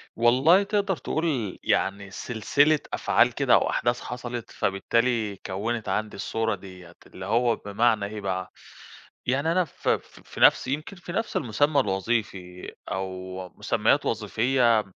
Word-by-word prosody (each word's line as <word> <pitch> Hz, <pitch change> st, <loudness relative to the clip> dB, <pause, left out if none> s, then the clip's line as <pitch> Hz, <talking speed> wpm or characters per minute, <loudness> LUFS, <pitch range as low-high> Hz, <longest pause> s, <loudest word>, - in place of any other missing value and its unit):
والله 130 Hz, -, +5 dB
تقدَر 200 Hz, -2 st, 0 dB
تقول 140 Hz, -, -2 dB
يعني 100 Hz, 0 st, 0 dB
سلسلة 140 Hz, +9 st, +2 dB
أفعال -, -, +3 dB
كده -, -, +2 dB
أو -, -, +4 dB
أحداث 120 Hz, +1 st, 0 dB
حصَلِت 120 Hz, -1 st, -6 dB
فبالتالي 110 Hz, +2 st, 0 dB
كوِّنِت 110 Hz, +4 st, -3 dB
عَندي 110 Hz, -1 st, -2 dB
الصورة 110 Hz, +2 st, -1 dB
ديّة، 90 Hz, -3 st, -13 dB
اللي 95 Hz, -, -9 dB
هو 115 Hz, +3 st, +2 dB
بمعنى 105 Hz, +1 st, +1 dB
إيه 105 Hz, 0 st, -6 dB
بقى، 95 Hz, -1 st, -3 dB, 0.7 s
يعني 140 Hz, +6 st, +1 dB
أنا 180 Hz, 0 st, +2 dB
ف -, -, -12 dB, 0.4 s
في -, -, -9 dB
نَفس، -, -, +6 dB
يمكن 155 Hz, +8 st, -3 dB
في 175 Hz, 0 st, -9 dB
نَفس 225 Hz, -, -1 dB
المُسمّى 145 Hz, +4 st, +2 dB
الوظيفي 95 Hz, -3 st, -2 dB, 0.2 s
أو 95 Hz, -1 st, -5 dB
مُسمّيات -, -, +1 dB
وظيفيّة 115 Hz, +1 st, +2 dB
115 Hz, 130 wpm, -26 LUFS, 100-130 Hz, 0.7 s, نَفس